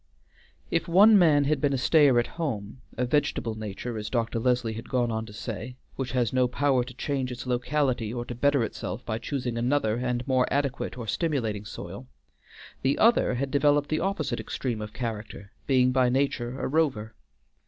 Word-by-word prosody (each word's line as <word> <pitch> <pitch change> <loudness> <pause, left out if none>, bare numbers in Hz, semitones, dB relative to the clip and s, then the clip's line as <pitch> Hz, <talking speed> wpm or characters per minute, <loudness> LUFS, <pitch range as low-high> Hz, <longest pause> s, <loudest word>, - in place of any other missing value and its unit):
If 165 +1 0
one 200 +6 +7
man 150 -5 +5
had 150 +2 0
been 145 -2 +2
a - - +1
stayer 140 -1 +4
at 120 - +3 0.2
home; 110 -6 -4 0.2
a 125 - +1
vegetable 125 -4 0
nature, 110 +2 -5
as 105 0 -5
Dr. 115 -1 -1
Leslie 120 -1 +1
had 115 +1 -8
gone 120 -2 +1
on 110 0 -3
to - - -10
say, 115 +3 -6 0.2
which 130 -2 -4
has 125 -3 +1
no 130 -1 +3
power 130 0 +1
to 125 0 -11
change 130 -1 -2
its 125 - -6
locality 125 -2 0
or 120 0 -4
to 120 - -6
better 140 +1 +2
itself 110 +1 -5
by 110 0 -2
choosing 125 -2 -3
another 120 -3 +1
and 125 +1 -2
more 130 -2 +2
adequate 140 -2 -1
or 120 - -5
stimulating 115 - -1
soil; 65 -8 -8 0.7
the 135 +1 +1
other 225 - +4
had 135 +2 -2
developed 145 0 +3
the 155 - 0
opposite 190 -5 -1
extreme 120 -5 -3
of 105 0 -6
character, 110 -3 -6 0.2
being 130 -2 +4
by 130 -1 +3
nature 130 -1 -1
a - - -1
rover. 130 -8 0
125 Hz, 185 wpm, -27 LUFS, 115-140 Hz, 0.7 s, one